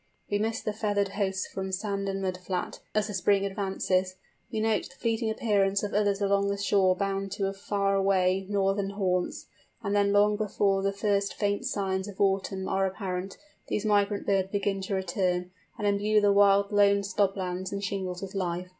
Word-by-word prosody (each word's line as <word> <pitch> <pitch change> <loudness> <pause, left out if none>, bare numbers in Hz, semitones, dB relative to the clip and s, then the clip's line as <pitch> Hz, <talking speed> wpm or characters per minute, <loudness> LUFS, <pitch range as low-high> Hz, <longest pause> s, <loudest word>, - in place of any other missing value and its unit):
We 205 - +2
miss 225 +1 -1
the 215 - -2
feathered 205 -2 0
hosts 195 -1 -1
from 190 0 -5
sand 195 +1 -2
and 195 0 -3
mud 185 -1 -1
flat 180 -1 -4 0.2
as 215 - +2
the 210 - -5
spring 195 +1 +2
advances; 190 -2 -1 0.4
we 220 - -2
note 220 -1 0
the 270 - -17
fleeting 225 -2 -1
appearance 200 -3 +1
of 205 - -3
others 205 -1 +2
along 200 0 +2
the 200 0 -1
shore 195 -2 +3
bound 195 0 -2
to 195 -1 -1
far 200 0 -1
away 190 -1 +2
northern 195 0 +1
haunts: 185 -3 -1 0.4
and 200 +1 -1
then 200 0 +3
long 205 +1 +4
before 200 -2 +1
the 195 0 +1
first 200 0 0
faint 205 +3 -1
signs 190 -4 -1
of 200 -2 -10
autumn 195 -1 0
are 195 0 +1
apparent 185 0 -4 0.3
these 210 - -2
migrant 205 -1 +2
birds 190 -1 +1
begin 200 -1 -1
to 195 +1 -2
return, 180 -1 -1 0.3
and 210 - -3
imbue 205 +1 +3
the 205 -1 +4
wild 200 0 +4
lone 200 -1 +4
slob 200 0 0
lands 185 0 -3
and 200 0 -4
shingles 190 -2 -3
with 195 - -6
life. 180 -2 -2
200 Hz, 190 wpm, -28 LUFS, 190-205 Hz, 0.4 s, long